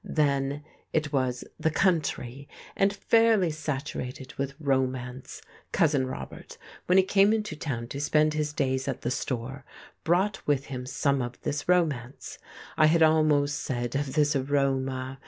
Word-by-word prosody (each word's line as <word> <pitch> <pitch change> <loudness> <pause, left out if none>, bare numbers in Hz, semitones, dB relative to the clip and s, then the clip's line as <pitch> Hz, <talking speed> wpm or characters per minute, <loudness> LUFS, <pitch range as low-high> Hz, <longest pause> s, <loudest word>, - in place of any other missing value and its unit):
Then 140 -1 0 0.3
it 155 -2 0
was 130 -3 0 0.2
"the 160 - +2
country," 145 -7 0 0.3
and 195 0 +3
fairly 220 -3 +3
saturated 140 -3 -5
with 140 0 -4
romance. 130 -3 -2 0.3
Cousin 145 -5 +2
Robert, 65 - -8 0.3
when 180 - +4
he 190 - +7
came 195 +2 +4
into 215 -7 -1
town 130 -6 -4
to 140 - -5
spend 155 +1 +3
his 150 -1 -1
days 130 -2 -1
at 135 - -3
the 120 - -2
store, 130 +2 -4 0.4
brought 190 +4 +1
with 140 -2 +1
him 125 0 -5
some 140 +1 +1
of 120 0 -5
this 145 +3 -3
romance, 145 -8 0 0.4
I 155 - +6
had 165 +1 +4
almost 155 -2 +3
said 120 -2 -3
of 140 -1 -2
this 150 0 +2
aroma. 135 -1 -1
140 Hz, 150 wpm, -27 LUFS, 130-155 Hz, 0.4 s, he